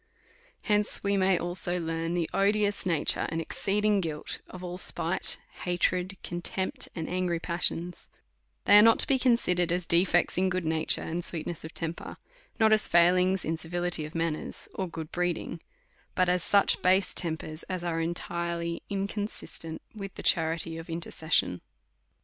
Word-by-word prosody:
Hence 210 Hz, -1 st, +2 dB
we 200 Hz, 0 st, +1 dB
may 190 Hz, -1 st, +3 dB
learn 170 Hz, -1 st, -1 dB
the 170 Hz, -2 st, 0 dB
odious 205 Hz, 0 st, +1 dB
nature 165 Hz, -4 st, +1 dB
and 165 Hz, -, -3 dB
exceed 200 Hz, +5 st, 0 dB
ing 210 Hz, -2 st, +3 dB
guilt 155 Hz, -3 st, -5 dB
of 185 Hz, 0 st, -10 dB, 0.2 s
spite, -, -, +1 dB, 0.2 s
hatred, 180 Hz, +1 st, -1 dB
contempt, 180 Hz, +2 st, -2 dB
and 160 Hz, -2 st, -4 dB
angry 180 Hz, -2 st, -1 dB
passions; 170 Hz, 0 st, -3 dB, 0.6 s
they 205 Hz, +1 st, +8 dB
are -, -, +9 dB
not 225 Hz, +1 st, +6 dB
to -, -, +4 dB
be 270 Hz, -1 st, +1 dB
considered 180 Hz, -9 st, +2 dB
as 180 Hz, 0 st, -1 dB
defects 175 Hz, +1 st, +3 dB
in 190 Hz, 0 st, +2 dB
good 185 Hz, -2 st, -2 dB
nature 160 Hz, 0 st, +3 dB
and 170 Hz, +2 st, -3 dB
sweetness 165 Hz, -1 st, -3 dB
of 160 Hz, -, -9 dB
temper, 165 Hz, 0 st, -5 dB, 0.4 s
not 220 Hz, -1 st, +5 dB
as 215 Hz, -, +6 dB
failings 180 Hz, +2 st, +3 dB
in 165 Hz, +1 st, -1 dB
civility 175 Hz, 0 st, -1 dB
of 155 Hz, +2 st, -9 dB
manners 165 Hz, -2 st, -3 dB
or 190 Hz, -, -3 dB
good 160 Hz, -2 st, -7 dB
breeding, 175 Hz, -1 st, -3 dB, 0.5 s
but 185 Hz, -1 st, +2 dB
as 180 Hz, -1 st, +1 dB
such 200 Hz, -1 st, +3 dB
base 185 Hz, +1 st, +3 dB
tempers, 160 Hz, -2 st, -3 dB
as 185 Hz, -2 st, -3 dB
are 165 Hz, -1 st, -1 dB
entirely 170 Hz, 0 st, -3 dB
inconsistent 200 Hz, -4 st, -3 dB
uith 195 Hz, -3 st, -7 dB
the -, -, -7 dB
charity 165 Hz, 0 st, +1 dB
of 165 Hz, -, -10 dB
inter 165 Hz, +1 st, -4 dB
cession. 155 Hz, -, 0 dB
175 Hz, 155 wpm, -28 LUFS, 165-190 Hz, 0.6 s, are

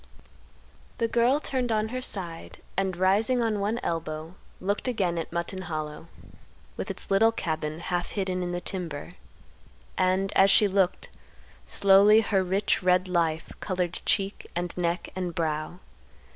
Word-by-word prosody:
The 230 Hz, -, +1 dB
girl 240 Hz, +5 st, +3 dB
turned 255 Hz, -5 st, -1 dB
on 215 Hz, 0 st, +1 dB
her 255 Hz, +2 st, -3 dB
side 175 Hz, -9 st, -5 dB
and 190 Hz, -2 st, -1 dB
rising 205 Hz, +7 st, +3 dB
on 225 Hz, -3 st, 0 dB
one 210 Hz, +4 st, -1 dB
elbow 160 Hz, 0 st, -3 dB, 0.3 s
looked 200 Hz, +6 st, -1 dB
again 185 Hz, -8 st, 0 dB
at 165 Hz, -, -5 dB
Mutton 170 Hz, +2 st, -3 dB
Hollow 155 Hz, -2 st, -5 dB, 0.7 s
with -, -, -5 dB
its -, -, -3 dB
little 220 Hz, +4 st, +5 dB
cabin 155 Hz, -6 st, -3 dB
half 175 Hz, 0 st, -2 dB
hidden 190 Hz, -2 st, -2 dB
in 175 Hz, 0 st, -2 dB
the 175 Hz, -, -2 dB
timber. 170 Hz, -7 st, -5 dB, 0.9 s
And, 185 Hz, +1 st, +1 dB
as 195 Hz, +1 st, +6 dB
she 205 Hz, +1 st, +6 dB
looked, 190 Hz, -2 st, 0 dB, 0.6 s
slowly 200 Hz, +2 st, +6 dB
her 200 Hz, -3 st, +1 dB
rich 190 Hz, +3 st, +1 dB
red 185 Hz, 0 st, +3 dB
life 165 Hz, -3 st, 0 dB
colored 180 Hz, -2 st, -2 dB
cheek, 195 Hz, 0 st, -1 dB
and 175 Hz, 0 st, -2 dB
neck, 175 Hz, 0 st, -1 dB
and 180 Hz, -3 st, -3 dB
brow. 155 Hz, +1 st, -2 dB
185 Hz, 145 wpm, -27 LUFS, 170-205 Hz, 0.9 s, as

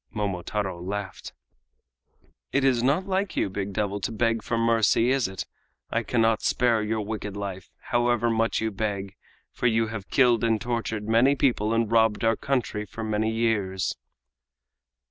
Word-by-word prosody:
Momotaro 100 Hz, -2 st, -3 dB
laughed. 95 Hz, +1 st, -5 dB, 1.2 s
"It 135 Hz, -, +1 dB
is 130 Hz, -3 st, +3 dB
not 140 Hz, +9 st, +2 dB
like 195 Hz, 0 st, -1 dB
you, 95 Hz, -, 0 dB
big 100 Hz, +1 st, -3 dB
devil, 100 Hz, 0 st, -2 dB
to 115 Hz, -, -2 dB
beg 115 Hz, 0 st, +1 dB
for 115 Hz, -, -2 dB
mercy, 115 Hz, +1 st, +3 dB
is 135 Hz, -5 st, +2 dB
it? 95 Hz, -1 st, -5 dB, 0.5 s
I 115 Hz, -, +1 dB
cannot 115 Hz, 0 st, +1 dB
spare 120 Hz, -3 st, +2 dB
your 110 Hz, +1 st, -1 dB
wicked 105 Hz, -1 st, -5 dB
life, 95 Hz, -3 st, -6 dB, 0.2 s
however 120 Hz, -1 st, +2 dB
much 115 Hz, 0 st, +1 dB
you 110 Hz, 0 st, -1 dB
beg, 100 Hz, -1 st, -3 dB, 0.4 s
for 125 Hz, -, 0 dB
you 115 Hz, -1 st, +2 dB
have 105 Hz, -3 st, -7 dB
killed 120 Hz, -4 st, +4 dB
and 115 Hz, -1 st, +2 dB
tortured 115 Hz, -3 st, -3 dB
many 120 Hz, +5 st, +4 dB
people 120 Hz, -6 st, +1 dB
and 115 Hz, -1 st, +1 dB
robbed 110 Hz, -2 st, +3 dB
our 115 Hz, 0 st, +3 dB
country 125 Hz, -6 st, -1 dB
for 110 Hz, +3 st, -7 dB
many 110 Hz, 0 st, 0 dB
years." 105 Hz, -6 st, 0 dB
110 Hz, 160 wpm, -26 LUFS, 105-120 Hz, 1.2 s, killed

